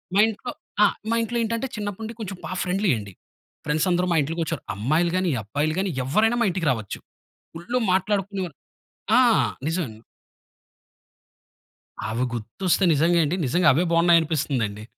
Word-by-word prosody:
మా - - +4
ఇంట్లో 225 +3 -5 0.3
ఆ! - - +8 0.3
మా - - +2
ఇంట్లో 235 +1 -2
ఏంటంటే 230 +4 -2
చిన్నప్పటి 205 0 -5
నుండి 225 +2 -5
కొంచెం 190 -3 -5
బా - - -6
ఫ్రెండ్లీ 190 0 +1
అండి. 100 -2 -8 0.5
ఫ్రెండ్స్ 155 +4 +1
అందరూ 180 +1 +2
మా - - +2
ఇంట్లకొచ్చేవారు. 165 -1 -3
అమ్మాయిలు 155 +11 +1
గానీ, 185 -2 +1
అబ్బాయిలు 145 +9 -1
గానీ 195 -2 0
ఎవ్వరైనా 220 - +2
మా 235 - +4
ఇంటికి 170 -4 -2
రావచ్చు. 110 -5 -4 0.6
ఫుల్లు 175 +10 -2
మాట్లాడుకునేవారు 195 -3 -1 0.6
ఆ! - - +7 0.5
నిజమేండి. 145 -11 -3 2.1
అవి 115 +3 -1
గుర్తొస్తే 165 - -1
నిజంగా, 165 +4 +3
ఏండి 155 +4 0
నిజంగా 175 +7 +2
అవే 160 +7 +2
బాగున్నాయనిపిస్తుందండి. 155 -11 +2
170 Hz, 140 wpm, -24 LUFS, 145-195 Hz, 2.1 s, ఆ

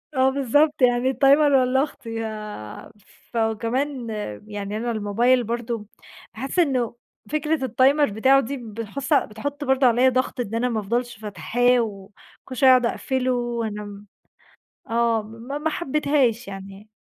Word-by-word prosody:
آه، 260 0 +4
بالضبط 280 +2 +2
يعني 245 +1 +3
ال 265 - -3
timer 290 +1 +6
والّا 255 +2 +2
اختي 260 -5 -8
يا 215 - -6 0.4
فكمان 230 +3 -1 0.4
يعني 205 0 -5
أنا 235 +1 -2
الموبايل 230 +4 +2
برضو 230 -2 -4 0.5
بأحس 270 +10 -3
إنّه 255 -8 +1 0.3
فكرة 305 -2 0
ال 240 - -7
timer 280 -2 +4
بتاعه 260 +6 +4
دي 275 +3 -4
بتحص 230 +5 -4
بتحط 285 +4 -1
برضو 265 -1 +2
عليّا 245 +2 +5
ضغط 255 0 -1
إن 225 -2 -3
أنا 250 +2 0
ما 225 -2 -1
افضلش 240 +3 -2
فاتحاه 220 +5 +1
وكل 210 +4 -8
شويّة 260 +2 +5
اقعد 250 -1 +5
أقفله، 255 +1 -1
وأنا 230 -3 -3
م 205 0 -10 0.8
آه، 230 -1 +2
ما 230 +6 -7
ما 315 +2 -1
حبيتهاش 280 - 0
يعني. 195 +2 -10
240 Hz, 145 wpm, -23 LUFS, 220-265 Hz, 0.8 s, timer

